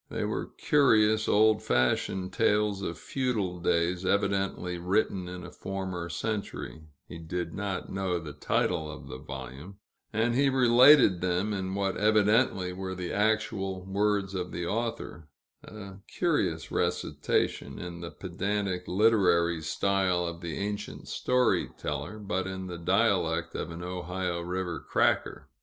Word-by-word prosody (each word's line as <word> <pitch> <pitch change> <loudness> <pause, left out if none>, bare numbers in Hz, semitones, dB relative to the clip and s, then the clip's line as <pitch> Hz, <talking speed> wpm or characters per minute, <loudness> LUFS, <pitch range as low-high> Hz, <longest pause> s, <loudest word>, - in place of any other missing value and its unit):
They - - -3
were - - -2
curious, 110 -7 +4
old 110 +1 +4
fashioned 90 +9 0
tales 105 -2 +2
of 85 -4 -4
feudal 110 -10 -2
days, 85 +2 +1
evidently 95 -2 0
written 90 0 0
in 90 0 -7
a 90 - -9
former 95 -3 -5
century, 100 -4 -4 0.3
he 85 - -9
did 85 +1 -4
not 100 -2 -4
know 95 -2 -1
the 75 -3 -7
title 75 +1 0
of 75 - -9
the 65 - -7
volume, 70 +6 -8 0.3
and 115 +2 +1
he 135 +3 +3
related 125 - +6
them 90 +3 0
in 95 -1 -3
what 100 -1 -1
evidently 105 -3 +3
were 95 0 -5
the 90 -1 -4
actual 105 -3 0
words 100 0 0
of 90 -1 -3
the 85 - -3
author: 110 -6 -3 0.4
a 100 -3 -10
curious 85 - -1
recitation, 70 - -1
in 85 -1 -7
the 85 - -5
pedantic 95 +1 -3
literary 90 -5 +3
style 95 +1 +1
of 85 0 -5
the 85 -3 -4
ancient 105 0 -5
story 125 0 +1
teller, 75 +8 -4
but 95 -3 -2
in 95 0 -5
the 90 -2 -6
dialect 85 - +1
of - - -4
an 85 +1 -7
Ohio 90 0 -3
river 90 0 -3
"cracker." - - 0
95 Hz, 140 wpm, -29 LUFS, 85-105 Hz, 0.4 s, related